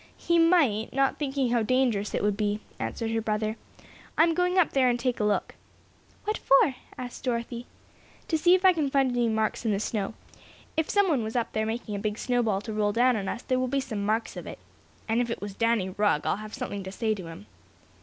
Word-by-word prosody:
"He 340 0 +2
might; 310 - +3
not 270 0 +1
thinking 270 -4 0
how 240 -1 +3
dangerous 225 -3 +1
it - - -1
would 205 -1 +2
be," 210 0 -1 0.2
answered 225 -1 -3
her 225 0 0
brother. 215 0 -1 0.6
"I'm 330 +1 +5
going 360 +2 +1
up 360 - +4
there 260 -2 +3
and 240 0 0
take 250 0 -1
a - - +1
look." 210 -1 0 0.7
"What 425 +1 -2
for?" 275 0 +4 0.2
asked 250 -1 -7
Dorothy. 235 -1 -3 0.6
"To 325 - 0
see 350 +3 +5
if 370 +1 0
I 375 - +8
can 305 -5 0
find 270 -2 +2
any 240 -1 +1
marks 220 0 -1
in 225 - +1
the 200 - 0
snow. 215 0 -2 0.6
If 320 -1 0
someone 375 - +3
was 220 +2 -5
up 240 -2 0
there 220 0 0
making 225 -1 -4
a 200 - -2
big 210 0 -2
snow 245 0 +1
ball 210 -4 0
to 220 0 -6
roll 210 -1 +1
down 245 +2 +4
on 195 -3 -2
us 235 - -5
there 255 -1 0
will 255 - 0
be 275 +2 0
some 225 -7 -4
marks 220 +2 -1
of - - -7
it. - - -7 0.5
And 225 +2 +2
if 240 - -2
it 230 - -3
was 205 -1 -6
Danny 230 -3 +1
Rugg 205 -6 +1
I'll - - +1
have 215 +1 -8
something 250 -6 -4
to 190 - -7
say 220 +2 0
to 190 -5 -7
him." 165 -11 -10
235 Hz, 235 wpm, -27 LUFS, 210-270 Hz, 0.7 s, I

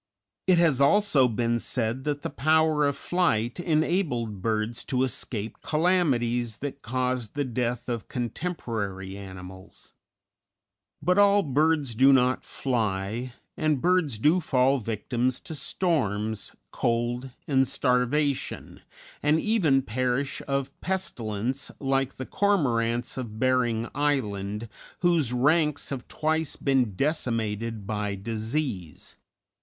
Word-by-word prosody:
It 185 -2 +5
has 160 -6 +3
also 150 -3 +5
been 120 +1 0
said 120 +3 -1
that 145 -1 -2
the - - -3
power 155 0 +3
of 140 - -1
flight 130 -9 0
enabled 155 - 0
birds 110 +2 -1
to 130 -1 +1
escape 115 -4 -3
calamities 125 - +1
that 140 0 -6
caused 125 -1 -2
the 145 - 0
death 125 -1 -2
of 120 -4 -3
contemporary 115 - -4
animals; 95 -1 -10 1.1
but 180 +2 +3
all 200 0 +5
birds 150 -2 +1
do 130 +5 +6
not 130 -1 +3
fly; 115 -1 -2 0.2
and 155 -3 +1
birds 175 -7 +2
do 155 - +3
fall 135 -4 +2
victims 120 +3 -1
to - - -7
storms, 110 - -1 0.2
cold, 120 +2 -1 0.2
and 135 -2 +3
starvation, 135 +2 0 0.4
and 150 +2 +3
even 160 -11 +2
perish 130 +3 -1
of 140 -1 -1
pestilence, 130 - -2
like 135 -1 0
the 130 - -6
Cormorants 125 - +1
of 110 -4 -6
Bering 120 -2 +1
Island, 110 -7 -1 0.3
whose 170 -8 +3
ranks 150 +3 +2
have 135 -3 -5
twice 160 0 -1
been 130 -7 +1
decimated 115 - -1
by 105 -1 -2
disease. 110 - -4
130 Hz, 115 wpm, -26 LUFS, 115-150 Hz, 1.1 s, do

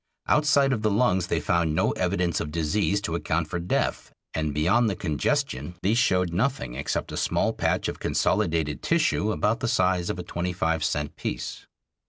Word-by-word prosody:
Outside 145 -2 +3
of 110 - -2
the 110 - +2
lungs 100 -4 +2
they - - 0
found 85 -2 +1
no - - +2
evidence 85 -2 0
of 75 - -4
disease 95 +6 0
to 85 - -3
account 80 -1 -1
for 85 - -3
death, 85 +1 -1 0.2
and 80 -1 -1
beyond 90 +11 +2
the 100 - -2
congestion 75 -1 -1
these 110 +5 +3
showed 90 -7 +2
nothing 100 - -1
except 70 +3 -3
a - - -5
small - - +1
patch - - 0
of - - -5
consolidated 80 -3 0
tissue 155 -10 +1
about 110 +2 0
the 120 - -1
size 90 -4 +1
of - - -2
a 90 - -5
twenty 90 0 -3
five 80 -2 0
cent 75 -2 -1
piece. - - -5
90 Hz, 185 wpm, -26 LUFS, 80-105 Hz, 0.2 s, Outside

